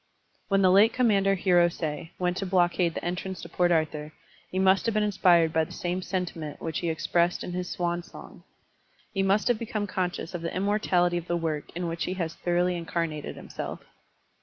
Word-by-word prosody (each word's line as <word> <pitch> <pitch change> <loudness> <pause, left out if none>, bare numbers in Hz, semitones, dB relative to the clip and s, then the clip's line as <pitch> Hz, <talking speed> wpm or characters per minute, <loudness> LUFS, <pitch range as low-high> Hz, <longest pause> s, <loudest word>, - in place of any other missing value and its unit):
When 195 -1 +2
the 185 - +6
late 210 +5 +6
commander 200 -6 +3
Hiros6 175 -3 +1
went 180 -1 0
to 195 - -2
blockade 175 -2 +2
the - - -4
entrance 180 +2 -3
to - - -8
Port 175 -1 +2
Arthur, 155 -2 0 0.4
he 185 - -4
must 190 +3 +3
have 225 - 0
been 215 - +3
inspired 175 -5 +4
by 160 -1 +3
the - - -8
same 180 +1 -3
sentiment 175 -5 -4
which 160 -1 -3
he 170 - -1
expressed 170 +2 +1
in - - -5
his 180 0 -3
swan 175 0 -1
song; - - -13 0.7
he 195 - 0
must 195 +2 +2
have 240 -3 +2
become 215 -2 -2
conscious 180 -2 -3
of 175 - -4
the 165 - -4
immortality 185 -3 +2
of 175 0 -5
the 175 - 0
work 160 -3 -2
in 175 0 -2
which 165 0 -2
he 185 - -3
has 165 -3 -3
thoroughly 175 +1 0
incarnated 165 -3 -3
himself. - - -7
175 Hz, 195 wpm, -27 LUFS, 170-190 Hz, 0.7 s, the